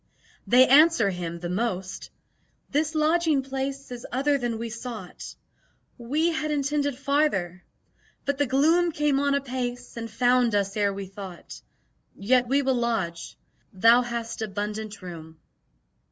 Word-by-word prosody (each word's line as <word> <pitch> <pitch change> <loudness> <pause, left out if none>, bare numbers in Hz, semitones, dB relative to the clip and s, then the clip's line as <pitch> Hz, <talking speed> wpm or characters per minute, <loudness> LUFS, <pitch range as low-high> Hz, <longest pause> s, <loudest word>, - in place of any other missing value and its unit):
They 255 +1 +7
answer 280 -7 +5
him, 170 -2 -5
the 175 - -3
most, 190 -1 -3 0.6
"This 305 +2 0
lodging 310 -2 +2
place 270 0 -4
is 245 -1 -7
other 280 +3 +1
than 240 -2 -2
we 230 0 -5
sought; 230 -5 -8 0.6
We 295 +8 0
had 305 -1 -2
intended 285 -2 0
farther, 260 - 0 0.6
but 280 0 -1
the 285 - +2
gloom 325 +7 +3
Came 295 -2 +1
on 280 0 +2
apace, 245 -2 -4
and 230 0 -5
found 245 0 +2
us 200 -1 0
ere 205 -1 +2
we 195 0 -6
thought: 190 -2 -10 0.5
Yet 245 +4 +2
will 275 +2 +1
we 265 - +3
lodge. 225 -9 -2 0.4
Thou 230 +6 +6
hast 235 -2 -4
abundant 210 0 -4
room." 160 -3 -9
245 Hz, 140 wpm, -26 LUFS, 205-280 Hz, 0.6 s, They